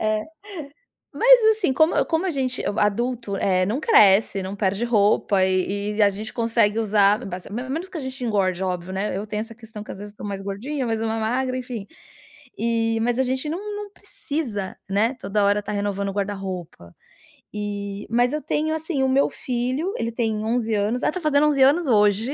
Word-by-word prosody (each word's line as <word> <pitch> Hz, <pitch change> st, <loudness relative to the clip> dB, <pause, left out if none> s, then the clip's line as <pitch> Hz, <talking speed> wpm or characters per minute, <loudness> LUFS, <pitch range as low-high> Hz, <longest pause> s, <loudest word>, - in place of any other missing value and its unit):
É. 215 Hz, 0 st, 0 dB, 0.9 s
Mas, -, -, +7 dB
assim, 370 Hz, -11 st, +1 dB
como 315 Hz, +5 st, +3 dB
como 330 Hz, +3 st, 0 dB
a -, -, +1 dB
gente 260 Hz, -4 st, -1 dB, 0.2 s
adulto, 230 Hz, 0 st, 0 dB
eh, 185 Hz, -1 st, +2 dB
não 225 Hz, +9 st, -1 dB
cresce, 200 Hz, -, +5 dB
não 190 Hz, +2 st, -5 dB
perde 200 Hz, +2 st, 0 dB
roupa 205 Hz, -3 st, +3 dB
e 200 Hz, +3 st, -1 dB
e 220 Hz, -, +3 dB
a 205 Hz, -, +7 dB
gente 215 Hz, +4 st, -6 dB
consegue 230 Hz, -2 st, +1 dB
usar 210 Hz, -1 st, +3 dB
bas 180 Hz, -1 st, -6 dB
ao -, -, -10 dB
menos 270 Hz, +9 st, -4 dB
que 360 Hz, -, -8 dB
a -, -, -3 dB
gente 260 Hz, -1 st, -6 dB
engorde, 190 Hz, -5 st, 0 dB
óbvio, 180 Hz, 0 st, -3 dB
né. 195 Hz, 0 st, -2 dB
Eu 205 Hz, +2 st, -4 dB
tenho 210 Hz, 0 st, -3 dB
essa 225 Hz, +1 st, -7 dB
questão 220 Hz, -2 st, -10 dB
que -, -, -11 dB
às -, -, -7 dB
vezes 205 Hz, 0 st, -9 dB
estou 210 Hz, -, -8 dB
mais 195 Hz, -1 st, -4 dB
gordinha, 250 Hz, +8 st, -4 dB
mais 225 Hz, -1 st, -1 dB
uma 225 Hz, 0 st, -1 dB
magra, 255 Hz, +3 st, -1 dB
enfim, 245 Hz, -5 st, -5 dB, 0.7 s
e 225 Hz, 0 st, 0 dB
mas 245 Hz, +1 st, 0 dB
a -, -, +4 dB
gente 260 Hz, +3 st, -2 dB
não 335 Hz, +5 st, -3 dB, 0.2 s
não 415 Hz, -1 st, -6 dB
precisa, 235 Hz, -, -5 dB
né, 220 Hz, +6 st, +2 dB
toda 200 Hz, +1 st, 0 dB
hora 205 Hz, +1 st, +3 dB
estar 205 Hz, -, -6 dB
renovando 200 Hz, -1 st, -2 dB
o -, -, -6 dB
guarda-roupa. 190 Hz, -, -5 dB, 0.6 s
E 205 Hz, -1 st, -5 dB
mas 245 Hz, +3 st, +2 dB
eu 300 Hz, -, -2 dB
tenho, 310 Hz, +2 st, -1 dB
assim, 320 Hz, -3 st, -2 dB
o 265 Hz, -, +2 dB
meu 270 Hz, +2 st, +3 dB
filho, 255 Hz, +9 st, -2 dB
ele 230 Hz, 0 st, -2 dB
tem 225 Hz, -2 st, -1 dB
11 225 Hz, 0 st, 0 dB
anos 210 Hz, +4 st, 0 dB
Ah, -, -, +3 dB
está 365 Hz, -, -5 dB
fazendo 300 Hz, -1 st, +3 dB
11 280 Hz, -3 st, +3 dB
anos 300 Hz, +6 st, +4 dB
hoje. 210 Hz, +2 st, +3 dB
220 Hz, 200 wpm, -23 LUFS, 200-260 Hz, 0.9 s, Mas